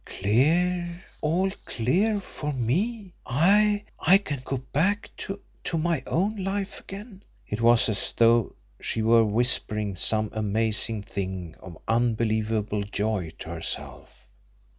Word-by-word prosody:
"Clear! 170 - +1 0.2
All 180 +5 +1
clear 190 - +1
for 150 -5 -5
me! 185 - -1
I 205 - +3
I 185 +4 +6
can 145 -10 -5
go 135 - -2 0.2
back 200 +8 +1
to 195 0 -5 0.3
to 165 - -1
my 165 -3 0
own 200 +6 0
life 195 +1 -3
again!" 200 0 -10 0.3
It 105 +2 -3
was 120 +1 +5
as 110 -3 -1
though 115 -1 +4 0.3
she 110 - -1
were 115 +1 +6
whispering 105 -2 +1
some 110 +3 +1
amazing 110 0 -1
thing 95 -6 -5
of 90 -3 -11
unbelievable 110 -2 +1
joy 100 -4 -2
to - - -8
herself. - - -6
120 Hz, 125 wpm, -26 LUFS, -, 0.3 s, I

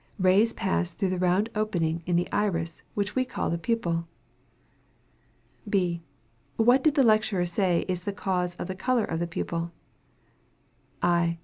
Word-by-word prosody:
Rays 195 +4 +4
pass 185 -4 -1
through 195 -3 0
the 185 - -1
round 185 +4 +2
opening 170 -7 -1
in 175 - +1
the 175 +1 +1
iris, 170 -5 -1
which 205 -1 -1
we 260 - +3
call 255 - -3
the 170 - -1
pupil. 170 -6 -1 1.6
B. 180 -4 +1 0.5
What 245 +4 +4
did 310 -2 +3
the 275 - +5
lecturer 215 -5 +3
say 175 -1 +1
is 180 -2 -2
the 205 - -3
cause 180 -3 -1
of - - -5
the 185 - -3
color 235 +4 +1
of 165 - -3
the 170 - -1
pupil? 170 0 -3 1.3
_I. 170 -1 +2
185 Hz, 155 wpm, -27 LUFS, 170-215 Hz, 1.6 s, the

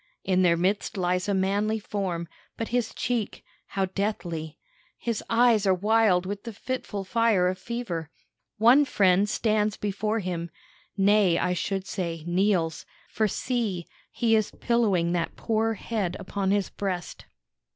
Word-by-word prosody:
In 185 -1 +2
their 170 -2 +4
midst 195 +4 0
lies 180 +1 0
a - - +2
manly 200 +3 +1
form, 190 -5 -3 0.3
but 225 - -3
his 240 -2 0
cheek, 235 -4 -2 0.2
how 195 -1 -1
deathly! 175 -5 -3 0.4
His 230 -3 -3
eyes 230 -3 +4
are 190 - +5
wild 205 -2 +3
with 200 +1 -5
the 230 - -6
fitful 210 -3 -4
fire 215 -2 +2
of 185 0 -2
fever. 190 -9 -4 0.5
One 240 +7 +6
friend 200 -6 +3
stands 215 -1 +1
before 210 +2 -1
him 175 -4 -3 0.5
nay, 195 -3 +4
I 180 - +1
should 195 +1 -2
say, 170 -6 -4
kneels; 175 -2 +1 0.2
for 215 0 +1
see, 210 -6 -2 0.3
he 225 -1 +2
is 215 -2 +1
pillowing 205 -8 +1
that 175 -1 -1
poor 225 0 0
head 205 -4 -3
upon 195 -1 -2
his 200 -1 +1
breast. 185 -4 -4
200 Hz, 145 wpm, -26 LUFS, 180-220 Hz, 0.5 s, One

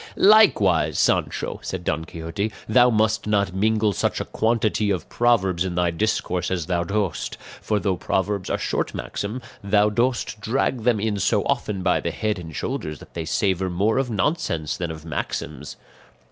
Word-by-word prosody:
"Likewise, 215 0 +5
Sancho," - - 0
said 95 -2 -5
Don 80 -1 -1
Quixote, 85 +5 -4 0.2
"thou 125 +3 +5
must 110 -2 +1
not 100 -3 +1
mingle 110 +1 +2
such - - 0
a - - -3
quantity 110 -2 +1
of 90 -6 -1
proverbs 95 -7 +2
in 90 -2 -3
thy 90 -1 +2
discourse 90 -2 -1
as 90 -3 -1
thou 85 -1 0
dost; 100 0 -2 0.2
for 105 -1 0
though 95 -1 0
proverbs 100 +1 -1
are - - 0
short - - -2
maxims, 100 - -4 0.2
thou 105 +1 +3
dost 120 -1 0
drag 120 +1 -1
them 120 -4 +3
in 105 -1 -1
so - - +2
often 100 -3 -1
by 90 -1 +3
the - - -2
head 105 +3 -2
and 80 -3 -9
shoulders 75 -1 -3
that - - -15
they 85 -2 -4
savour 95 0 0
more 100 +7 +1
of 135 -2 -1
nonsense 100 - -1
than 85 -2 -3
of 80 0 -8
maxims." 75 -2 -5
100 Hz, 175 wpm, -23 LUFS, 90-110 Hz, 0.2 s, Likewise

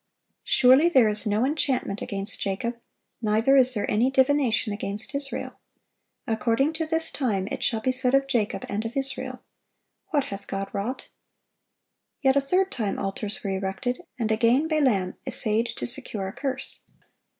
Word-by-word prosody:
"Surely 265 +6 +5
there 260 -9 +5
is 210 +1 +1
no 210 +4 +2
enchantment 265 -8 0
against 195 0 -2
Jacob, 200 +5 -2 0.5
neither 225 +5 +3
is 255 -1 +5
there 205 - 0
any 230 +5 +2
divination 265 -5 +2
against 205 +5 -4
Israel: 280 0 -4 0.7
according 235 +5 +1
to 320 0 -2
this 325 0 0
time 205 -9 -1
it - - -4
shall 225 -2 0
be 255 - +1
said 255 0 +1
of 275 0 +3
Jacob 250 -2 -1
and 210 -2 -2
of 230 +4 -5
Israel, 270 0 -4 0.7
What 290 -3 +2
hath 200 0 -8
God 195 0 -3
wrought!"(928) 220 +7 -3 1.2
Yet 265 0 +4
a 280 - +4
third 370 +7 +1
time 215 -6 -2
altars 200 +1 -3
were 200 - -2
erected, 195 +6 -2 0.2
and 225 -3 -1
again 235 +7 +3
Balaam 255 - +1
essayed 230 -2 +1
to 120 - -4
secure 195 - -3
a 190 - -6
curse. 270 0 -3
240 Hz, 160 wpm, -26 LUFS, 210-270 Hz, 1.2 s, Surely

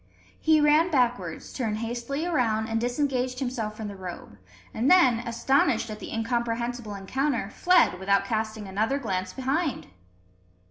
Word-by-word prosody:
He 315 -1 +4
ran 300 +3 +4
backwards, 240 - -1
turned 220 -5 -2
hastily 240 +7 -3
around, 230 -10 +1
and 225 0 0
disengaged 255 0 -1
himself 240 -5 -3
from 220 - -5
the 200 - -7
robe; 180 - -9 0.3
and 235 +5 +1
then, 265 -11 +6
astonished 235 -1 +1
at 215 - -7
the - - -8
incomprehensible 235 -1 -2
encounter, 230 +2 -2
fled 355 - +3
without 200 +1 +2
casting 220 -1 -3
another 215 +8 0
glance 185 -8 -3
behind! 275 +2 -2
235 Hz, 140 wpm, -26 LUFS, 215-270 Hz, 0.3 s, then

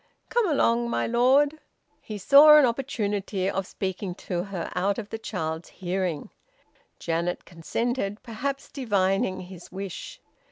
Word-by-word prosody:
Come 465 -5 +2
along, 235 -5 +2
my - - 0
lord." 270 +6 +3 0.4
He 215 - -7
saw 290 +8 +8
an 295 - +7
opportunity 210 -6 -2
of 195 -1 -2
speaking 190 -1 -4
to 180 -2 -4
her 190 -4 -5
out 195 +3 0
of 215 -3 -6
the 225 - -4
child's 160 -6 -4
hearing. 180 -4 -3 0.7
Janet 170 +2 -2
consented, 205 +5 -3
perhaps 270 +4 -4
divining 195 -7 0
his 180 -1 -11
wish. 195 -1 -7
200 Hz, 130 wpm, -26 LUFS, 185-245 Hz, 0.7 s, saw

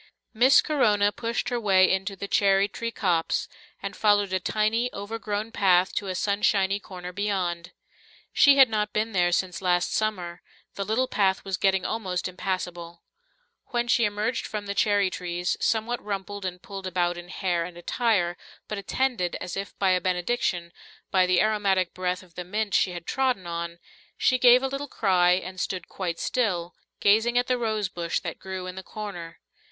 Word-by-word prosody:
Miss 250 +4 +6
Corona 210 -9 +2
pushed 230 +3 -3
her 245 -1 -1
way 190 -4 +5
into 190 +1 -2
the 200 - -6
cherry 195 0 +3
tree 230 +3 -4
copse, 175 -7 0 0.4
and 200 0 -4
followed 205 -2 +2
a 185 - +2
tiny, 220 +5 0
overgrown 210 +1 -4
path 185 -3 +3
to 200 - -2
a 185 - -3
sunshiny 200 0 +1
corner 180 -2 -9
beyond. 180 -4 -2 0.6
She 280 -1 +6
had 270 -1 +8
not 210 -2 -1
been 220 +1 0
there 175 -3 +2
since 180 0 -1
last 175 -1 +1
summer; 180 -5 -2 0.3
the 200 - -3
little 220 +6 0
path 195 -4 +1
was 195 -1 -1
getting 190 0 +1
almost 190 -6 -2
impassable. 180 -2 -5 0.6
When 240 -1 -1
she 240 -1 +3
emerged 210 +3 -1
from 210 -1 -5
the 200 - -3
cherry 200 -1 +2
trees, 175 0 -2
somewhat 230 +2 0
rumpled 200 -1 -5
and 180 -1 -5
pulled 195 -4 -7
about 175 -1 0
in 175 0 -10
hair 175 -2 -1
and 175 0 -8
attire, 175 -2 0 0.3
but 215 - -4
attended, 205 -3 -1
as 180 - -5
if 195 -1 -6
by 195 -2 +2
a 180 0 +2
benediction, 180 -1 -1 0.4
by 185 -1 +4
the 180 -1 +3
aromatic 200 -4 +1
breath 180 0 -2
of 175 -2 -20
the 180 - -6
mint 205 +3 -3
she - - +3
had 175 -1 -7
trodden 255 -8 0
on, 170 0 -4 0.4
she 255 -1 +2
gave 250 +1 +7
a - - +1
little 275 +2 -4
cry 180 -7 +3
and 185 0 -3
stood 185 -2 -3
quite 175 -3 -4
still, 180 -8 -1 0.3
gazing 225 +4 +3
at 245 - +3
the 250 -1 0
rosebush 200 -7 -1
that 170 - -6
grew 190 -1 -6
in 185 - -5
the 190 - -7
corner. 185 -5 -8
195 Hz, 180 wpm, -26 LUFS, 180-215 Hz, 0.6 s, had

